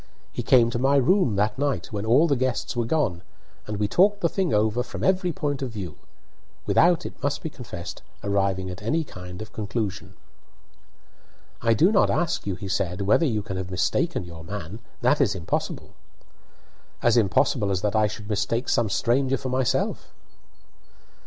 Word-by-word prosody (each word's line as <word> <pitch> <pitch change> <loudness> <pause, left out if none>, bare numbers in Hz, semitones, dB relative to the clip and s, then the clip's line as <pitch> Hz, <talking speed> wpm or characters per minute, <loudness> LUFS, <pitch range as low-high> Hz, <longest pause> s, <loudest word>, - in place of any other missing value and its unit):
He - - -4
came 120 -2 +4
to 120 - -2
my 135 +2 +3
room 140 - +3
that 105 +4 0
night, 140 -5 -1
when 105 +1 -3
all 140 +9 +5
the 140 - +2
guests 130 -1 -1
were 120 -1 0
gone, 115 - 0 0.5
and 105 -1 -3
we 105 0 +1
talked 200 - +3
the 170 - +2
thing 190 -2 -1
over 110 +3 +2
from 120 - -6
every 185 -1 +2
point 145 -3 -2
of 130 - -2
view; 100 -8 -6 0.7
without, 175 -1 +3
it - - -8
must 140 - -1
be 160 - -4
confessed, 90 -10 -8 0.2
arriving 95 -2 0
at 90 - -8
any 155 +10 0
kind 90 -6 -9
of 110 - -13
conclusion. 105 -2 -4 1.5
"I 115 -1 +3
do 175 - +4
not 205 - +4
ask 170 -10 0
you," 95 - -1
he 100 - -7
said," 95 -1 -1
whether 105 - +3
you 110 -5 -1
can 95 -3 -5
have 95 -1 -4
mistaken 95 - 0
your 85 -2 -10
man. 100 +2 -6 0.2
That 130 +5 +3
is 110 -8 +2
impossible." 85 -3 -3 1.1
"As 120 - +4
impossible 100 -1 +2
as 95 -2 0
that 105 0 0
I 110 -1 +4
should 105 0 -8
mistake 105 +4 -1
some 115 -3 +2
stranger 130 +6 +1
for 130 +1 -5
yourself." 130 +1 0
110 Hz, 180 wpm, -25 LUFS, 100-140 Hz, 1.5 s, all